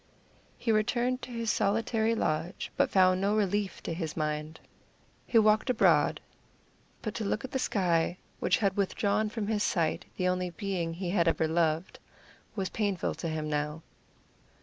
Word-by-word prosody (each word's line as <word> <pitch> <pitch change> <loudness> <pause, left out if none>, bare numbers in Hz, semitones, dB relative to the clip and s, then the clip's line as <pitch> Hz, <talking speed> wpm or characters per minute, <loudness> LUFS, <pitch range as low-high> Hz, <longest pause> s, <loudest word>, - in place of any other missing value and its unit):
He 230 - 0
returned 240 +4 +1
to - - -8
his 230 -2 -1
solitary 225 +2 +1
lodge, 165 -1 -2
but - - +2
found 185 -1 +4
no 200 +2 +2
relief 205 -2 0
to - - -3
his 160 -2 -4
mind. 155 0 -2 0.7
He 235 - +3
walked 215 +2 +4
abroad, 250 - +3 0.8
but 215 - -3
to 230 - -3
look 215 +4 -1
at 260 - -9
the 265 - -1
sky, 175 -7 +1 0.2
which - - +2
had 195 -3 +1
withdrawn 205 +2 +1
from 220 -1 -3
his 210 0 0
sight 165 -6 0
the 185 - +1
only 180 0 0
being 175 -2 -3
he 175 0 -3
had 175 -3 +2
ever 160 -1 +2
loved, 165 +1 0 0.6
was 190 -3 -2
painful 200 -5 -1
to 165 - -4
him 155 -1 -3
now. 150 +1 -2
195 Hz, 165 wpm, -29 LUFS, 165-215 Hz, 0.8 s, found